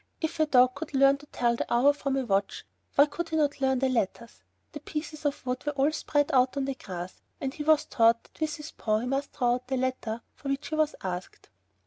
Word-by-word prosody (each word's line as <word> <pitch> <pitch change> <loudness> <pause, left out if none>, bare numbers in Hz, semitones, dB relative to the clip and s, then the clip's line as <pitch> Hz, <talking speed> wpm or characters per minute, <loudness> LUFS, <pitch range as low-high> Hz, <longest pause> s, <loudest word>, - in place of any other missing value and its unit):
If 320 0 -3
a 310 - +3
dog 255 -3 +5
could 300 -1 -7
learn 275 +1 +5
to 295 - -15
tell 240 -3 +1
the - - -4
hour 255 +5 +5
from 275 -2 -2
a 265 - -1
watch, 200 -2 -1 0.3
why 285 - +7
could 335 +3 -5
he 320 - -2
not 290 -3 +1
learn 265 -1 +2
the 265 +1 +1
letters? 235 -1 -2 0.3
The 295 - -7
pieces 305 +1 -6
of 285 -2 -1
wood 250 0 -2
were 295 - -2
all 280 +2 +2
spread 290 -2 0
out 255 +1 +3
on 275 - 0
the 275 - -2
grass, 185 -7 -8 0.2
and 270 -1 -3
he 300 - -7
was 310 0 +4
taught 230 0 +3
that - - -23
with 310 -1 0
his 300 0 -9
paw 215 -1 0
he - - -3
must 270 +2 -2
draw 245 -3 +2
out 250 +1 -4
the 265 0 -1
letter 250 -3 -2
for 275 - -7
which 275 +2 -2
he 310 - -2
was 310 -1 +1
asked. 180 -1 -6
270 Hz, 250 wpm, -28 LUFS, 245-295 Hz, 0.3 s, why